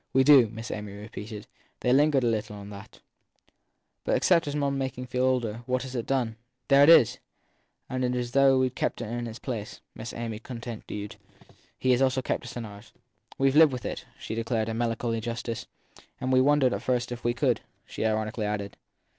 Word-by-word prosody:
We 130 - +5
do, 135 -5 +7
Miss 115 +1 -7
Amy 105 -1 -5
repeated 105 0 -8 0.4
they 125 - +3
lingered 145 -1 +4
a - - +2
little 110 -1 -1
on 100 0 -9
that. 100 +2 -12 1.0
But - - +1
except 170 -4 +3
making 135 -3 -1
one - - -9
feel 125 +1 -1
older, 120 -3 0
what 130 0 0
has 130 -1 -7
it 120 -3 -3
done 130 -4 +1
for - - -9
one? 110 - -17 0.3
There 140 0 +7
it 145 - +7
is! 125 -7 +7 0.7
And 130 0 -2
though 125 +2 +3
we 130 0 +2
ve - - -21
kept - - -2
him 110 - -6
in 120 0 -3
his 110 0 -7
place/ 115 -6 -5
Miss 115 +2 -7
Amy 115 -2 -5
con 120 0 -8
tinued, 105 -3 -7 0.6
he 130 - +1
has 125 +1 +3
also 130 -1 +2
kept - - -2
us 120 - -7
in 120 - -4
ours. 105 +1 -12 0.4
We 135 0 +3
ve 150 - +5
lived 155 -4 +7
with 125 - -5
it/ - - -4
she - - -6
declared 115 -1 -1
in 115 0 -3
melancholy 115 -1 -1
justice. 115 0 -4 0.5
And 130 0 -1
we 130 - +6
wondered 140 -2 +4
at - - -3
first 125 -1 -1
if 120 0 -6
we 120 0 +1
could! 125 -2 +1 0.2
she - - -5
ironically 110 0 -1
added. 100 -1 -4
120 Hz, 210 wpm, -27 LUFS, 110-130 Hz, 1.0 s, do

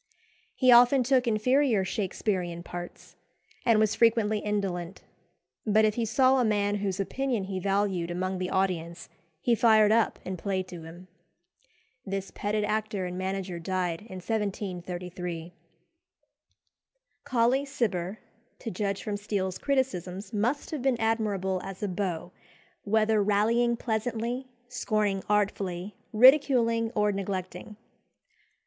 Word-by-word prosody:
He 255 -2 +4
often 245 +2 +7
took 255 0 +2
inferior 230 -1 +2
Shaksperean 185 -3 -2
parts, 175 0 -9 0.5
and 230 -2 +4
was 215 -1 +3
frequently 220 -2 +3
indolent; 195 -4 -3 0.6
but 215 0 +4
if 215 - +2
he 230 +1 -1
saw 260 +4 +3
a - - +3
man 205 -2 +1
whose 195 -1 -2
opinion 245 +2 -1
he 190 0 -4
valued 195 -2 0
among 185 +1 -2
the 185 0 -2
audience 175 -3 -2 0.3
he 240 - +2
fired 220 -2 +5
up 225 0 +2
and 185 -1 -4
played 190 -1 -2
to 175 -2 -8
him. 170 +3 -11 1.0
This 195 -2 -4
petted 210 +1 -1
actor 210 -2 -1
and 180 0 -5
manager 185 -1 -3
died 180 0 -2
in 190 - -8
1733. 180 -4 -4 1.7
Colley 255 0 +2
Cibber, 210 -9 -2 0.4
to 225 - -6
judge 200 +1 -2
from 210 -2 -3
Steele's 195 -3 -3
criticisms, 205 - -2
must 240 +7 -1
have 305 -4 -3
been 255 -2 +1
admirable 205 -5 0
as 195 +1 -7
a - - +1
beau, 180 -3 -3 0.5
whether 215 +1 +3
rallying 230 +4 +2
pleasantly, 235 +3 -2 0.2
scorning 215 -5 -1
artfully, 200 -2 -1 0.2
ridiculing, 235 -2 +5
or 210 -1 +2
neglecting. 190 0 -5
205 Hz, 125 wpm, -28 LUFS, 185-230 Hz, 1.7 s, often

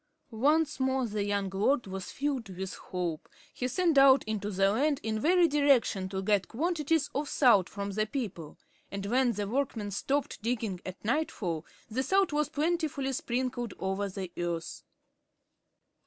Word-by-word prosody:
Once 295 +7 +2
more 260 -1 +1
the 210 -2 -2
young 200 -1 0
lord 235 +7 +1
was 190 -1 -6
filled 275 -6 -2
with 190 0 -5
hope. 175 -3 -4 0.2
He 250 - -2
sent 325 +2 +3
out 270 0 +7
into 210 -1 -3
the 195 0 +2
land 280 +6 +1
in 220 -1 -1
every 350 +1 +5
direction 275 -10 +2
to 190 0 -3
get 200 -2 +2
quantities 320 +2 0
of 285 +1 -2
salt 220 - +4
from 200 0 -4
the 215 +2 0
people. 200 - -5 0.3
And 200 0 -4
when 245 +3 +2
the 205 -1 -3
workmen 230 -4 -2
stopped 275 +8 -1
digging 225 -5 -2
at 185 +2 -8
nightfall, 205 - -1 0.2
the 240 +3 -1
salt 385 +5 +2
was 300 -1 +1
plentifully 300 -3 -1
sprinkled 245 -2 -2
over 195 +1 -1
the 190 -2 -6
earth. 170 -1 -3
230 Hz, 155 wpm, -30 LUFS, 195-280 Hz, 0.3 s, out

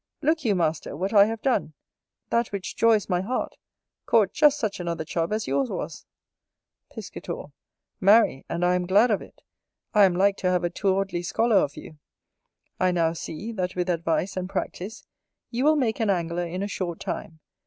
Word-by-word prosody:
Look 315 +2 +2
you, 215 -5 +2
master, 160 -4 -1
what 190 +6 -2
I 200 -1 +8
have 225 +1 -4
done, 240 - 0 0.6
that 235 0 +2
which 200 -2 -5
joys 225 -3 +3
my 180 -2 +1
heart, 245 +7 -3 0.5
caught 215 -5 +3
just 295 -1 +4
such 215 -7 -2
another 170 -2 -3
Chub 165 +3 -2
as 215 0 -1
yours 135 -1 0
was. - - -6 0.8
Piscator. - - -7 0.5
Marry, 200 -8 +4
and 175 - -1
I 180 - +3
am 180 -1 -1
glad 210 +6 +4
of 205 - +1
it: - - -15 0.5
I 210 -2 +7
am 180 -2 +2
like 200 +2 +3
to 185 - 0
have 180 -1 +1
a 175 - 0
towardly 190 -1 0
scholar 220 +5 +2
of 145 -6 +1
you. 155 - -11 0.8
I 185 0 +3
now 165 -2 +1
see, 170 +6 -6
that 185 -4 -3
with 180 0 0
advice 170 +2 -1
and 185 0 -3
practice, 195 +3 -5 0.5
you 245 +2 -1
will 310 +1 +5
make 245 -7 0
an 220 -2 +1
Angler 175 -2 -1
in 180 +3 -4
a - - -2
short 175 -4 -4
time. 160 -1 -5
190 Hz, 185 wpm, -25 LUFS, 175-220 Hz, 0.8 s, I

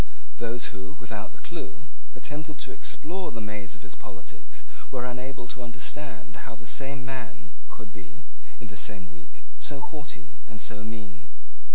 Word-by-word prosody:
Those 115 0 +5
who, 100 +9 -3
without 105 -2 0
the - - -13
clue, 165 -3 -1 0.3
attempted 150 0 +1
to - - -3
explore 180 +5 +4
the 115 - -2
maze 105 -3 +1
of 95 - -10
his 100 - -1
politics 95 -4 -6 0.2
were 125 -2 +3
unable 125 0 +1
to 130 - -4
understand 125 +5 -1
how 115 - -2
the 115 +1 -9
same 135 +2 +4
man 130 -1 -1 0.2
could 105 -3 -6
be, 105 +9 -8 0.3
in 120 - -2
the 100 -2 -4
same 95 -5 +3
week, 85 0 -12 0.2
so 145 - +4
haughty 120 - -3
and 110 - -3
so 105 0 +2
mean. 105 -6 -2
115 Hz, 165 wpm, -35 LUFS, 105-135 Hz, 0.3 s, Those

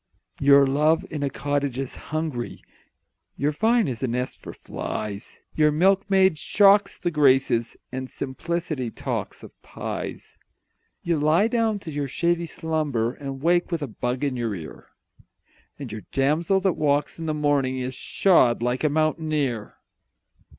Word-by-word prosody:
Your 140 0 +6
love 150 +4 +2
in 150 -3 -4
a 140 - 0
cottage 140 -1 -2
is 135 -1 -4
hungry, 155 -6 -3 0.7
Your 145 +2 +1
vine 225 +7 +2
is 125 -4 -4
a 130 - 0
nest 125 +2 -3
for - - -8
flies 105 0 -6
Your 150 -1 +3
milkmaid 190 +1 +3
shocks 200 +2 +4
the 175 - -2
Graces, 135 -6 +2
And 130 0 -5
simplicity 155 -1 -3
talks - - -5
of - - -11
pies! - - -7 0.6
You 170 -3 0
lie 160 +8 +3
down 225 -2 +1
to 160 - -7
your 145 -1 -2
shady 170 +4 0
slumber 150 -8 -1
And 135 -1 -7
wake 175 +2 +2
with 165 -3 -1
a - - -3
bug 125 +3 -3
in 140 -3 0
your 115 -4 -2
ear, 80 -4 -10 0.9
And 135 -6 -7
your 110 - -6
damsel 155 +8 +2
that 190 -2 +2
walks 145 +1 0
in 165 - -4
the 155 - -1
morning 145 -3 +1
Is 130 0 -3
shod 125 -7 +3
like 125 +3 -1
a 150 - +3
mountaineer. 155 -6 -1
145 Hz, 150 wpm, -24 LUFS, 130-165 Hz, 0.9 s, Your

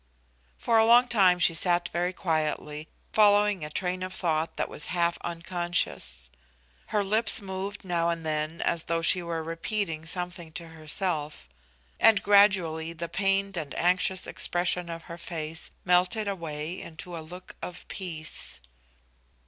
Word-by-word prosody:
For 230 -1 +2
a 220 - +5
long 240 +2 +6
time 195 -7 +4
she 170 -1 +4
sat 175 +1 +2
very 175 +1 -1
quietly, 155 -3 -2 0.3
following 205 -3 +4
a 150 - -5
train 180 +3 -3
of 185 0 -5
thought 160 -2 -1
that - - -1
was - - -5
half 170 -1 0
unconscious. 170 - -1 0.6
Her 210 - 0
lips 215 +3 +5
moved 195 +1 -6
now 170 -2 0
and 165 -1 -3
then, 155 +1 -2
as 165 - 0
though 165 0 -1
she 180 +2 +5
were 165 -1 -4
repeating 165 -1 -3
something 175 -2 -4
to 170 -1 -6
herself, 155 - -1 0.5
and 205 -3 +5
gradually 185 -6 +3
the 170 +1 -6
pained 195 +1 0
and 155 -4 -5
anxious 180 +1 +2
expression 175 0 0
of 165 -1 -6
her 170 0 -10
face 160 -1 -2 0.2
melted 180 +4 +2
away 165 -2 -4
into 170 +2 -8
a 165 - -6
look 180 +4 -11
of 180 - -8
peace. 165 -5 -4
175 Hz, 150 wpm, -27 LUFS, 160-190 Hz, 0.6 s, long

